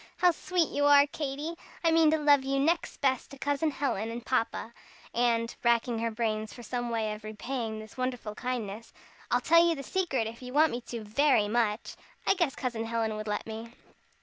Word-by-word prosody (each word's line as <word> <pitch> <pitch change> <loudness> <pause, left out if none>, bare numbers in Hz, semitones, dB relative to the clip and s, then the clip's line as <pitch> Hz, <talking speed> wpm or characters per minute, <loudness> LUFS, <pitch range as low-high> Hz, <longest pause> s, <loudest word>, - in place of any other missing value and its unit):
"How 360 -1 +5
sweet 345 0 0
you 285 0 0
are, 285 0 +7
Katy! 290 +2 -4 0.3
I 330 - +4
mean 325 -1 +5
to 315 - +3
love 290 -2 +4
you 275 +1 0
next 330 +5 0
best 260 -3 +1
to 275 - -11
Cousin 285 +3 0
Helen 270 -7 -2
and 235 +1 -6
Papa! 235 -2 -1 0.4
And" 235 -1 +1
racking 235 0 +2
her 230 0 0
brains 220 -1 -2
for 240 - -10
some 240 +1 -3
way 220 -2 -1
of 210 +1 -10
repaying 220 +1 -4
this 215 +1 -10
wonderful 250 -4 -3
kindness 230 -2 -4 0.4
"I'll 245 - +2
tell 335 +5 +6
you 340 -1 +3
the 275 - -6
secret, 285 - 0
if 230 +2 -7
you 250 0 -8
want 310 +2 +5
me 240 - -3
to 235 -2 -5
very 225 0 +3
much. 220 -1 0 0.3
I - - +5
guess 340 -8 0
Cousin 235 -4 -3
Helen 225 -1 -1
would 215 0 -5
let 210 0 -2
me." 225 +1 -7
245 Hz, 205 wpm, -29 LUFS, 225-285 Hz, 0.4 s, are